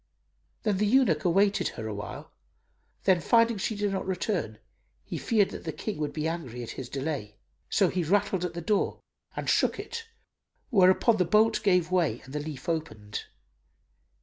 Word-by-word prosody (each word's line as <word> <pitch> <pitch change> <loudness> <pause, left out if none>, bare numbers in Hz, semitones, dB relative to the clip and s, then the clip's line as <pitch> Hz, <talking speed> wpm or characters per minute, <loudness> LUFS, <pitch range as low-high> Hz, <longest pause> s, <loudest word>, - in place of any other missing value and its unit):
Then 210 -3 +1
the 210 +2 +2
eunuch 205 - +3
awaited 195 +3 +3
her 110 - -5
awhile; 105 -1 -6 0.7
then, 185 -3 +4
finding 230 +5 +3
she 220 +3 -1
did 205 -1 -1
not 190 -1 -3
return, 180 - -2 0.5
he - - -5
feared 210 -4 +2
that - - -7
the - - -3
King 210 -7 -5
would 150 -1 -1
be 155 +1 -2
angry 130 -8 -4
at 115 - -6
his 125 -2 -7
delay; 135 -7 -4 0.3
so - - +3
he 180 -1 -1
rattled 190 +1 +1
at 175 -1 -3
the 170 - -4
door 200 +4 0 0.4
and - - -4
shook - - +2
it, 455 -1 -6 0.6
whereupon 195 +2 +5
the 180 - +3
bolt 215 +5 +3
gave 180 -4 +2
way 165 -11 +2
and 135 - -13
the 150 - -1
leaf 145 0 -7
opened. 110 -11 -3
180 Hz, 175 wpm, -28 LUFS, 150-205 Hz, 0.7 s, whereupon